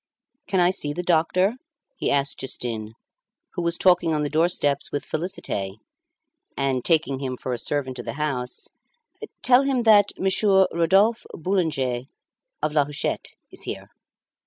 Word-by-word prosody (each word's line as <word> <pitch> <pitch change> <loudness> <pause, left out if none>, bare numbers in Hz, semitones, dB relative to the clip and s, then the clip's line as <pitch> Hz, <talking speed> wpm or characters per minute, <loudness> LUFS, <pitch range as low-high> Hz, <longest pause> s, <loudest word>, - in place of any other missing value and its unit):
"Can 190 - +1
I 175 0 +5
see 145 -5 -3
the 180 - -4
doctor?" 180 +6 +2 0.4
he - - -2
asked 140 0 0
Justin, 115 -4 -4 0.6
who 175 - -3
was 170 0 0
talking 175 -3 +3
on 150 - 0
the 145 - -2
doorsteps 155 -3 +1
with 145 - -3
Félicité, 150 - -3 0.8
and, 135 -2 0
taking 155 -5 +2
him 130 -2 -4
for 125 - -4
a 120 - -3
servant 130 -3 -2
of 120 - -6
the 115 - -3
house 130 -4 -3 0.7
"Tell 255 0 +6
him 270 -3 0
that 205 -3 +6
Monsieur 190 0 +3
Rodolphe 195 +7 +3
Boulanger 150 -9 -1 0.6
of 150 - 0
La 145 -2 +3
Huchette 145 0 -3 0.2
is - - -9
here." - - -6
155 Hz, 150 wpm, -24 LUFS, 135-185 Hz, 0.8 s, Tell